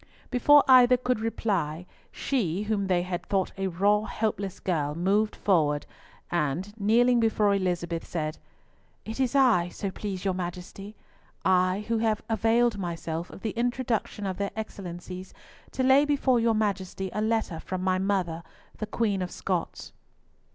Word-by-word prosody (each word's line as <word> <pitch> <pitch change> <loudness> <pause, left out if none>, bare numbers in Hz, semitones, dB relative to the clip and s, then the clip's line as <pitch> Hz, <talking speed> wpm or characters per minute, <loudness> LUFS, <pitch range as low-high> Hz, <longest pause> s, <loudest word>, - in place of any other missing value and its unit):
Before 290 +4 +6
either 250 -1 +7
could 250 -1 -1
reply, 185 -7 -2 0.3
she, 205 - -1
whom 205 -2 -1
they 180 -2 +2
had 175 -1 -4
thought 190 -2 0
a 195 0 -2
raw, 205 +4 +2
helpless 200 -4 -3
girl, 150 -5 -1
moved 200 +5 +1
forward, 150 -7 +1 0.5
and 175 +4 -1
kneeling 240 +4 +4
before 215 -3 +2
Elizabeth 175 -3 -2
said, 155 -2 -3 0.7
"It 220 +3 -6
is 260 0 0
I, 230 -11 +4
so 195 +2 -4
please 195 -1 -5
your 190 - +1
Majesty, 180 +3 -6 0.5
I, 185 +2 +2
who 230 -1 +1
have 220 -1 0
availed 225 0 +2
myself 170 -1 -4
of - - -12
the 220 - -2
introduction 235 -3 -2
of 190 -2 -3
their 200 0 -1
Excellencies 185 -3 -7 0.3
to 260 - -2
lay 265 +2 +6
before 280 -4 +2
your 230 -1 +2
Majesty 195 -3 -2
a 210 - -1
letter 220 -6 0
from 185 +2 -4
my 185 0 +1
mother, 185 -4 -1 0.4
the 215 - -3
Queen 205 -5 0
of 180 - -2
Scots." 180 -2 -4
200 Hz, 150 wpm, -27 LUFS, 180-225 Hz, 0.7 s, either